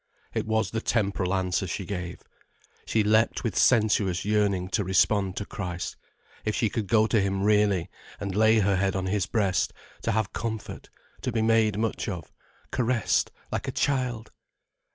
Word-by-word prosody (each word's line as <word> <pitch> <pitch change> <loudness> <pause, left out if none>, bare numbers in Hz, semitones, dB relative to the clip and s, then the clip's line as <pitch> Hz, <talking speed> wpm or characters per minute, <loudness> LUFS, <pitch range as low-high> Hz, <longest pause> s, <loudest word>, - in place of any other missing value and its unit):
It - - -2
was 110 -3 +1
the 110 - -2
temporal 100 -6 0
answer 95 -1 0
she 95 +3 -4
gave. 90 -2 -5 0.7
She 110 - +2
leapt 110 +2 +2
with 115 -6 -2
sensuous 105 -6 +3
yearning 100 -3 +1
to 105 +1 0
respond 95 +1 +2
to 100 - -3
Christ. 90 -3 -5 0.5
If 110 - -1
she 110 - +1
could 110 -4 -2
go 110 0 +4
to 110 -1 +2
him 95 0 0
really, 105 -4 +3 0.3
and 100 -2 -3
lay 110 +1 +5
her 100 -1 +2
head 95 +1 +1
on 95 -1 -1
his 95 -1 0
breast, 100 -6 +1 0.3
to 115 - 0
have 110 -2 -1
comfort, 110 -2 -5 0.3
to 125 - -2
be 110 -1 0
made 110 -2 +3
much 110 0 -1
of, 85 -7 -6 0.4
caressed 120 -3 +1 0.2
like - - -3
a - - -1
child! 125 -5 -1
105 Hz, 170 wpm, -27 LUFS, 95-110 Hz, 0.7 s, lay